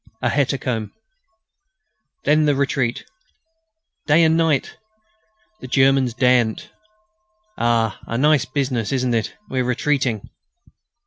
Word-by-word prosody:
A - - +2
hecatomb.... 130 -5 -1 1.3
Then... 155 0 +3
the 145 -1 +2
retreat... 135 -3 -1 1.0
day 155 +3 +5
and 160 0 +3
night.... 160 -4 0 0.8
The 130 - -9
Germans 135 -2 +2
daren't.... 125 -3 +1 0.8
Ah! 115 - 0
a 115 - -3
nice 145 0 +3
business, 130 -5 -2
isn't 130 -2 0
it? 115 -1 -2
We're 130 -1 -1
retreating." 125 -3 -1
130 Hz, 105 wpm, -20 LUFS, 120-140 Hz, 1.3 s, day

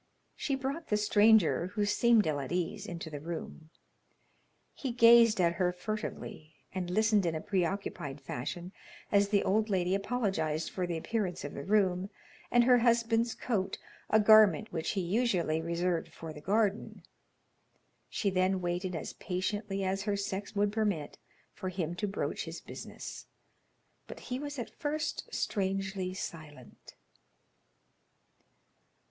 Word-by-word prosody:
She 275 - -1
brought 275 +5 -4
the 210 - +2
stranger, 210 -4 +4
who 210 - +1
seemed 225 +1 +4
ill 150 -2 0
at 135 - -5
ease, 180 +3 -2
into 170 -2 -6
the 145 - -5
room. 160 0 -7 1.0
He 265 - -4
gazed 230 -2 +7
at 170 -1 +3
her 180 -1 +3
furtively, 180 -5 -6 0.2
and 185 -2 -3
listened 215 +2 +3
in 165 -2 0
a - - -1
preoccupied 175 -6 -2
fashion 145 +7 -5 0.4
as 200 0 +4
the 200 -1 +3
old 215 +3 +1
lady 185 -2 +1
apologized 195 -7 -1
for 180 -2 -2
the 170 -1 -2
appearance 190 0 -2
of 145 - -6
the 140 - -6
room, 190 -1 +2 0.4
and 240 0 +5
her 250 0 +6
husband's 230 -1 +2
coat, 195 -6 -2 0.3
a 220 - +5
garment 210 -6 +6
which 160 -2 -2
he 195 - 0
usually 180 -5 +1
reserved 170 +1 -1
for 160 -1 -8
the 150 - -10
garden. 205 +3 0 1.1
She 200 - -1
then 185 +1 +2
waited 180 +1 -2
as 160 - -5
patiently 195 +2 -3
as 190 +1 -1
her 205 0 -1
sex 200 +1 -4
would 205 0 +2
permit, 205 -9 -1 0.3
for 190 -2 -5
him 175 -3 -3
to 210 - -1
broach 195 - -3
his - - -6
business, - - -9 0.8
but - - -9
he 250 0 -4
was 285 0 -5
at 240 - -5
first 300 0 -3
strangely 195 -2 -2
silent. 150 -8 -9
195 Hz, 145 wpm, -31 LUFS, 175-215 Hz, 1.1 s, gazed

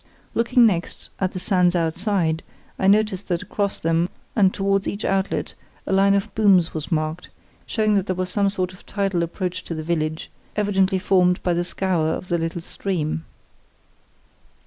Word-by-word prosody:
Looking 235 +1 +4
next 180 -6 -1
at 185 -1 0
the 185 - -4
sands 180 -1 +2
outside, 170 0 0 0.4
I 190 - +2
noticed 205 -1 +3
that 175 -2 -1
across 200 -1 -2
them 165 +2 +1 0.3
and 195 -4 +4
towards 195 0 0
each 200 - -3
outlet 195 0 -1 0.3
a - - -1
line 195 +1 +4
of 200 - -1
booms 195 -6 +4
was 155 -1 -5
marked, 155 +1 -2 0.4
showing 215 -2 +1
that 195 -2 +1
there 185 - 0
was 185 0 -2
some 200 0 +2
sort 185 -2 -2
of 185 - -16
tidal 195 -3 0
approach 180 +1 -3
to 165 - -4
the 155 - -4
village, 155 -1 -2 0.2
evidently 195 -2 +2
formed 180 -2 +2
by 180 - +2
the 175 +1 0
scour 180 -3 0
of 165 +3 -3
the 170 -1 +1
little 165 +1 -3
stream. 165 -3 -3
185 Hz, 170 wpm, -23 LUFS, 170-200 Hz, 0.4 s, Looking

